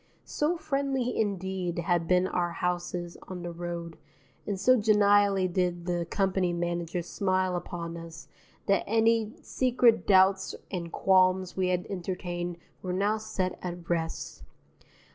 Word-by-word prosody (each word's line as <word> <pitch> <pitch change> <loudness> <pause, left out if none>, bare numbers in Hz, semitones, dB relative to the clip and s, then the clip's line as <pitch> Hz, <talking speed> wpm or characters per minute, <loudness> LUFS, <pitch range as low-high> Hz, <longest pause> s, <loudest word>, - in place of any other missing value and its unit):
So 315 +4 0
friendly 275 -5 -1
indeed 190 -4 -2
had 170 -1 0
been 180 +1 +3
our 175 -2 -1
houses 175 0 -3
on 180 -2 -6
the 175 - -4
road 170 -1 -6 0.5
and 200 -2 -2
so 255 +6 +5
genially 205 -3 +4
did 175 -1 -1
the 175 -2 -1
company 190 -3 +1
manager 175 0 -2
smile 185 0 0
upon 170 -1 -5
us 165 -1 -9 0.4
that 195 - +2
any 225 0 +2
secret 245 -3 +2
doubts 190 0 +4 0.2
and 170 -3 -4
qualms 185 -1 +3
we 185 -1 +1
had 180 -1 0
entertained 175 -2 -4 0.2
were 180 -1 -3
now 205 +3 +1
set 200 -4 -3
at 175 -1 -6
rest. 165 -1 -3
185 Hz, 135 wpm, -28 LUFS, 175-200 Hz, 0.5 s, so